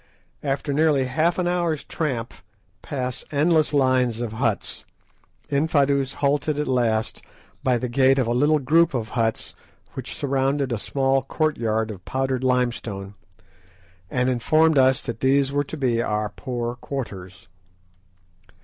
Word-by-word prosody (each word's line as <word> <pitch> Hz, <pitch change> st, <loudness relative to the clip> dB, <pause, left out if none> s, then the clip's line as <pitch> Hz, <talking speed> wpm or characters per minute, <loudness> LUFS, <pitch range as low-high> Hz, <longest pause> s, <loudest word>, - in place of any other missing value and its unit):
After 140 Hz, 0 st, -2 dB
nearly 150 Hz, -3 st, +3 dB
half 155 Hz, +7 st, +1 dB
an 180 Hz, -1 st, 0 dB
hour's 175 Hz, -4 st, 0 dB
tramp, 130 Hz, -8 st, -3 dB, 0.5 s
past 125 Hz, -3 st, -4 dB
endless 155 Hz, +1 st, +3 dB
lines 130 Hz, -4 st, +2 dB
of 120 Hz, -2 st, -3 dB
huts, 110 Hz, -, -2 dB, 0.7 s
Infadoos 140 Hz, -2 st, +1 dB
halted 145 Hz, +1 st, 0 dB
at 150 Hz, -, -1 dB
last 115 Hz, -3 st, 0 dB, 0.4 s
by 130 Hz, -3 st, +2 dB
the 125 Hz, -, -3 dB
gate 130 Hz, +2 st, +3 dB
of 130 Hz, -, +2 dB
a 120 Hz, -, 0 dB
little 145 Hz, +5 st, +3 dB
group 155 Hz, +3 st, +3 dB
of 110 Hz, -3 st, -2 dB
huts 115 Hz, -1 st, -1 dB, 0.4 s
which -, -, -6 dB
surrounded 135 Hz, 0 st, 0 dB
a 115 Hz, -, -1 dB
small 135 Hz, +3 st, +1 dB
courtyard 115 Hz, -7 st, -1 dB
of 95 Hz, -4 st, -10 dB
powdered 130 Hz, +1 st, -2 dB
limestone, 120 Hz, -6 st, -1 dB, 1.0 s
and 125 Hz, 0 st, 0 dB
informed 155 Hz, +5 st, +3 dB
us 130 Hz, 0 st, +3 dB
that 115 Hz, -2 st, -5 dB
these 135 Hz, +1 st, +2 dB
were 145 Hz, 0 st, +1 dB
to 160 Hz, -, -7 dB
be 120 Hz, -5 st, +1 dB
our 105 Hz, -1 st, -1 dB
"poor" 120 Hz, 0 st, -4 dB
quarters. 100 Hz, -9 st, -7 dB
130 Hz, 140 wpm, -23 LUFS, 120-145 Hz, 1.0 s, nearly